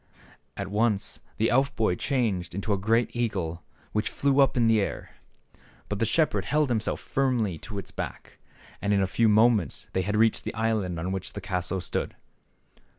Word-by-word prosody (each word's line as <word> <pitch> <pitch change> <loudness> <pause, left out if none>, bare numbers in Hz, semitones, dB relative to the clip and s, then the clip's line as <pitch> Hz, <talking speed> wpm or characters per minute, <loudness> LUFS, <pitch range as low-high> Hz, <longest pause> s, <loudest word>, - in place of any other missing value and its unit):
At - - -3
once 105 -1 0 0.2
the 110 - +2
elf 135 +3 +2
boy 110 -5 +2
changed 95 - -1
into 100 +2 -1
a - - +1
great 115 +5 +1
eagle 95 -8 -2 0.3
which 105 0 0
flew 140 0 +1
up 135 -2 +4
in 120 - +4
the 110 -2 +4
air. - - -4 0.8
But 105 - -2
the 115 - +2
shepherd 155 +7 +1
held 150 -1 +2
himself 110 -1 -1
firmly 120 - 0
on 105 - -5
its 100 - -6
back, - - -7 0.4
and 100 0 +1
in 100 - +3
a - - +3
few 110 +4 +2
moments 110 - +3
they 95 - +1
had 105 +3 -1
reached 110 +1 +3
the - - -5
island 110 -6 0
on 90 +3 -2
which 95 -1 -4
the - - -5
castle 90 0 -2
stood. 85 - -3
110 Hz, 185 wpm, -27 LUFS, 95-120 Hz, 0.8 s, up